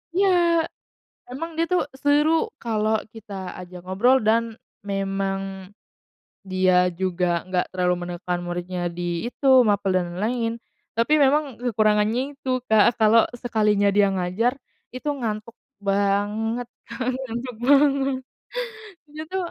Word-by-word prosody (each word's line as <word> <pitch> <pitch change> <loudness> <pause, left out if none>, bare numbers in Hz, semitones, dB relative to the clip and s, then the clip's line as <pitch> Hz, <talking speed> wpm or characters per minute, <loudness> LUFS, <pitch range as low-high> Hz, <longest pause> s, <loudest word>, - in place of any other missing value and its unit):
Iya, 390 +2 +4 1.0
memang 290 +7 -5
dia 330 - +2
tuh 360 - +4 0.2
seru 290 +2 +4 0.3
kalau 220 -2 0 0.2
kita 220 -2 -11 0.3
ajak 180 0 -11
ngobrol 220 +8 +3
dan 225 +2 +4 0.5
memang 195 0 -1 1.1
dia 185 0 +3 0.3
juga 185 -1 0 0.2
enggak 185 -1 0
terlalu 180 -1 +1
menekan 175 0 -3
muridnya 175 +1 -4 0.2
di 175 - -4 0.2
itu, 250 +3 -5 0.2
mapel 200 -1 +1
dan 180 - +1
lain-lain. 230 +4 -1 0.4
Tapi 230 +6 +1
memang 295 +3 +3 0.2
kekurangannya 215 0 +2 0.2
itu, 270 -1 -5 0.2
Kak, 220 +2 +5
kalo 220 +1 +6 0.2
sekalinya 210 -4 +2
dia 205 -1 +5
ngajar 190 +7 0 0.4
itu 255 +4 -5
ngantuk 230 -4 -4 0.3
banget, 205 +4 0 0.6
ngantuk 240 0 -5
banget. 275 -1 +4 1.0
Gitu. 310 +4 -6
215 Hz, 115 wpm, -23 LUFS, 195-250 Hz, 1.1 s, kalo